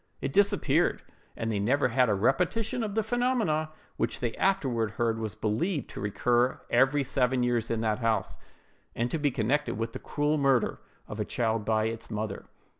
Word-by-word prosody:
It 135 0 -3
disappeared, 200 0 +2 0.3
and 115 0 -2
they 105 - -1
never 130 +6 +2
had 125 0 +3
a 105 - +3
repetition 180 - +1
of 210 -2 -3
the 220 - +2
phenomenon, 235 -11 +1 0.3
which 115 - -1
they 120 -2 -2
afterward 130 - 0
heard 115 -1 +1
was 110 -4 -4
believed 130 - -1
to - - -7
recur 120 +4 +1
every 140 +2 +4
seven 125 -1 +1
years 120 -2 +1
in 115 -1 -1
that 110 -2 0
house, 115 -2 0 0.6
and 120 +1 -1
to 165 - -1
be 145 -1 +2
connected 135 +3 0
with 115 +1 -3
the - - -5
cruel 150 +1 0
murder 135 -4 +2 0.3
of - - -7
a - - +1
child 115 -3 -1
by 110 0 +2
its 115 +1 -4
mother. 105 -1 -4
125 Hz, 185 wpm, -28 LUFS, 115-150 Hz, 0.6 s, every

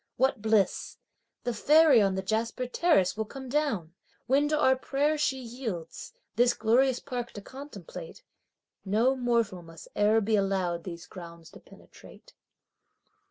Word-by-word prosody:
What 260 -2 +1
bliss! 220 -2 +1 0.5
the 245 - -1
fairy 295 +1 +5
on 195 -2 +2
the 190 - -3
jasper 225 +5 -1
terrace 250 - +2
will 220 0 -2
come 265 +3 -9
down! 245 - -1 0.3
When 280 +3 +3
to 305 0 +1
our 260 -3 +4
prayers 290 +3 0
she 270 -3 +1
yields, 230 -9 -6 0.3
this 245 0 +4
glorious 250 +4 +3
park 245 -2 -5
to 205 - -8
contemplate, 295 - -10 0.6
No 225 +7 +2
mortal 235 -7 0
must 165 -1 -13
e'er 210 +2 +4
be 220 +1 +1
allowed 190 -4 0
these 170 -2 -7
grounds 170 -2 -11
to - - -13
penetrate. - - -17
235 Hz, 145 wpm, -28 LUFS, 195-270 Hz, 0.6 s, fairy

